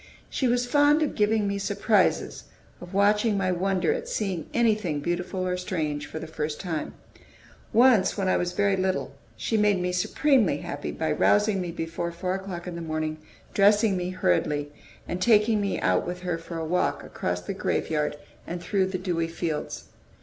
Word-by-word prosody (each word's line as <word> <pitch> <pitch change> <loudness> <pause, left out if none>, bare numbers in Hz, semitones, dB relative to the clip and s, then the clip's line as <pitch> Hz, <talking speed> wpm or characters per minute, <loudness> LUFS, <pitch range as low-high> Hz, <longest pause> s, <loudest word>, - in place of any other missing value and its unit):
She 260 - 0
was 245 +1 +2
fond 290 +4 +4
of 300 - -1
giving 210 0 +2
me 200 0 -1
surprises, 200 - +1 0.4
of 180 0 -10
watching 210 +1 +3
my 185 -1 +1
wonder 190 - +1
at 480 0 -5
seeing 190 - -2
anything 215 -10 +1
beautiful 180 +4 -2
or 180 0 0
strange 155 -5 -3
for - - -7
the 160 - -5
first 155 -1 -4
time. 165 -5 -4 0.8
Once, 235 -4 +4
when 195 -2 0
I - - +3
was 175 0 -1
very 200 +1 +2
little, 190 0 -1 0.2
she 225 - 0
made 210 -2 +3
me 180 0 -1
supremely 250 +7 +2
happy - - -5
by - - -2
rousing 205 -2 +3
me 175 - -3
before 165 0 -4
four 180 +2 -3
o'clock 190 -3 -5
in 180 - -5
the 170 - -6
morning, 155 -1 -2 0.4
dressing 205 0 +4
me 180 0 -2
hurriedly, 145 - 0 0.4
and 180 - -4
taking 215 0 +4
me 200 -1 -1
out 90 - +2
with 180 +1 -5
her 175 -2 -2
for 165 0 -7
a 160 - -3
walk 180 +3 0
across 90 0 -3
the 90 - -4
graveyard 150 -2 -1 0.3
and 175 - -4
through 190 +2 0
the 190 0 -3
dewy 175 -3 -1
fields. 165 -2 -4
185 Hz, 180 wpm, -26 LUFS, 165-210 Hz, 0.8 s, fond